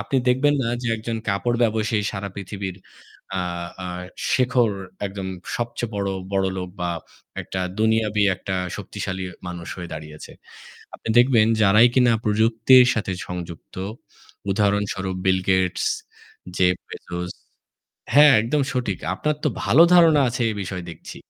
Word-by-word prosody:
আপনি 135 - -2
দেখবেন 135 +4 +3
না 115 - -1
যে 120 - -1
একজন 115 +1 -4
কাপড় 120 +5 0
ব্যবসায়ী 110 -1 +1
সারা 100 0 -4
পৃথিবীর 100 -1 -6 0.6
আ - - 0 0.4
আ - - -4 0.5
শেখর 125 -3 +3 0.4
একদম 95 -1 -6 0.3
সবচেয়ে 120 -1 -4
বড় 100 -1 -1 0.2
বড়লোক 95 -1 -1
বা 90 0 -1 0.5
একটা 95 - -5 0.2
দুনিয়াবী 110 -2 +2
একটা 95 0 -4 0.2
শক্তিশালী 95 -2 -5 0.2
মানুষ 85 -1 -7
হয়ে 90 -1 -7
দাঁড়িয়েছে। 75 -1 -9 0.7
আপনি - - -8
দেখবেন 120 -3 +5
যারাই 105 +4 +6
কিনা 125 -2 +4
প্রযুক্তির 115 +4 +5
সাথে 105 -3 -2 0.2
সংযুক্ত, 85 -2 -8 0.8
উদাহরণস্বরূপ 100 -2 0
বিল 95 0 +3
গেটস, 95 -1 +1 0.7
জেফ 90 -1 +3
বেজোস 90 0 -6 0.8
হ্যাঁ, 145 -1 +8
একদম 140 +6 0
সঠিক। 120 -8 -2 0.2
আপনার 150 +7 -1
তো - - +4 0.2
ভালো 155 +7 +6
ধারণা 165 -4 +6
আছে 120 +1 -2
এ - - -2
বিষয়ে 90 -1 -5
দেখছি। 80 - -10
105 Hz, 130 wpm, -23 LUFS, 95-120 Hz, 0.8 s, হ্যাঁ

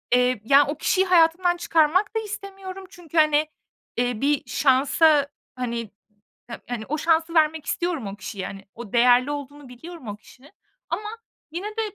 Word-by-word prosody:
eee, 250 -3 +2
ya, 280 +2 +6
o 295 +1 -3
kişiyi 380 +4 +1
hayatımdan 350 0 +3
çıkarmak 345 +6 +2
da - - +2
istemiyorum. 390 -2 -8
Çünkü, 340 -4 -9
hani, 305 0 +4 0.5
eee, 245 -1 -1
1 285 0 +1
şansa, 285 +2 +3 0.3
hani, 235 -3 -4 0.6
ha - - -7
hani, 230 -3 -4
o 305 - -1
şansı 325 +1 +1
vermek 315 -1 +2
istiyorum 340 - -2
o 195 - -6
kişiye. 195 0 -6
Hani, 195 0 -10
o 235 -2 -10
değerli 245 +3 +4
olduğunu 285 -1 -7
biliyorum 320 +1 -11
o 205 - -5
kişinin 255 +7 -19 0.4
ama 425 0 -3 0.4
yine 360 +5 -4
de, 440 +1 -3
300 Hz, 160 wpm, -24 LUFS, 250-345 Hz, 0.6 s, ya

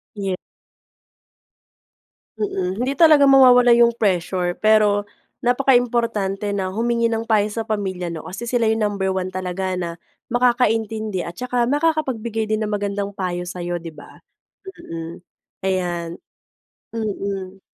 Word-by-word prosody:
Ye 195 -2 -2 2.0
Mm, 190 -2 -2
hindi 275 - -1
talaga 305 -2 +6
mawawala 250 -3 +7
yung 235 0 +6
pressure. 180 -2 0
Pero 210 -1 +3 0.3
napakaimportante 235 -6 +1
na 190 -2 -2
humingi 235 +3 0
ng 225 0 -2
payo 215 -2 +2
sa 225 +1 -4
pamilya, 185 -5 -3
'no, 160 +2 -7
kasi 200 +6 -6
sila 235 -2 +1
yung 220 0 0
number 200 -2 -1
1 185 0 -2
talaga 185 0 -3
na 170 -2 -4 0.3
makakaintindi 225 -5 +1
at 170 - -6
tsaka 245 +3 -1
makakapagbigay 260 -7 0
din 215 0 -1
ng 210 - -1
magandang 200 0 -2
payo 180 -2 -2
sa'yo, 175 -1 -4
'di 165 - -7
ba? 150 - -15 0.7
Mm. 165 +1 -6 0.5
Ayan. 175 -3 -1 0.9
Mm. 195 -3 -4
205 Hz, 125 wpm, -21 LUFS, 185-235 Hz, 2.0 s, mawawala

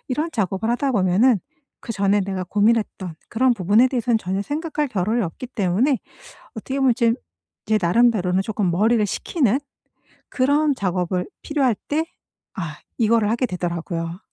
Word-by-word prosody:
이런 305 +6 -1
작업을 200 0 -1
하다 265 +3 0
보면은 200 +3 +3 0.4
그 230 - -5
전에 200 0 +2
내가 190 -1 -3
고민했던 205 -3 0
그런 250 +1 +2
부분에 210 +6 +4
대해서는 240 -3 +1
전혀 190 0 -2
생각할 300 +2 -2
겨를이 215 +2 0
없기 175 +9 -6
때문에 225 +6 +1 0.6
어떻게 265 +5 -4
보면 260 -3 +4
제 230 -1 +3 0.5
제 215 0 +2
나름대로는 190 -1 +3
조금 200 -3 -1
머리를 215 +4 +3
식히는 260 - 0 0.7
그런 285 +2 +2
작업을 180 -3 -1 0.2
필요할 275 -6 +1
때 315 +2 +1 0.5
아 155 -5 -4 0.2
이거를 225 -2 +3
하게 240 +3 +1
되더라고요. 170 -1 -4
220 Hz, 340 characters per minute, -22 LUFS, 185-255 Hz, 0.7 s, 부분에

